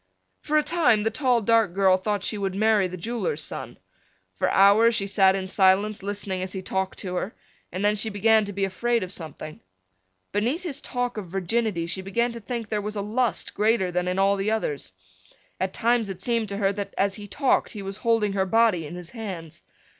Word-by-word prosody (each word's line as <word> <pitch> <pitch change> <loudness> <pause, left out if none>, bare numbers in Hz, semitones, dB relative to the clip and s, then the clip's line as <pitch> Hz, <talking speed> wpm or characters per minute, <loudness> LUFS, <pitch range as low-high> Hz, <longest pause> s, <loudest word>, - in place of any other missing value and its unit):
For 305 - +1
a 305 - +3
time 295 -12 +2
the 225 - +1
tall 245 -2 +1
dark 225 -4 +3
girl 190 -1 +5
thought 200 +1 -2
she - - -1
would 195 -1 -2
marry 215 -2 +3
the 185 0 -7
jeweler's 235 - -2
son. - - -5 0.6
For - - 0
hours 215 +4 +5
she 195 - +1
sat 195 -1 +4
in 190 -1 -3
silence 195 +2 +3
listening 200 -1 -3
as 185 0 -4
he 190 -1 -5
talked 190 0 -2
to 180 -2 -5
her 200 - -4 0.4
and 185 +4 -2
then 210 0 +3
she 215 +2 -1
began 220 +1 +3
to 205 - -5
be 195 0 -1
afraid 230 +4 0
of 185 +1 -6
something. 155 -3 -8 0.7
Beneath 240 - 0
his 300 -5 -3
talk 245 -2 -3
of 200 -4 -5
virginity 195 0 -1
she 180 +3 -4
began 235 +6 0
to 235 - -7
think 230 0 -5
there 210 -1 -1
was 210 +1 -5
a 205 - -2
lust 225 +4 -1
greater 210 -4 +2
than 180 0 -1
in 180 +1 -1
all 195 +1 +3
the 195 +2 -1
others. 150 - -2 0.7
At 190 0 -1
times 235 -1 +1
it 190 -2 -6
seemed 230 +1 0
to 200 - -4
her 200 -1 +1
that 200 0 -5
as 195 0 +2
he 205 0 -7
talked 270 +6 +1
he 205 -3 -6
was 195 +1 -6
holding 225 -4 +1
her 190 -1 0
body 215 -7 +3
in 170 - -8
his 175 -1 -9
hands. 190 -9 -7
205 Hz, 215 wpm, -25 LUFS, 190-225 Hz, 0.7 s, girl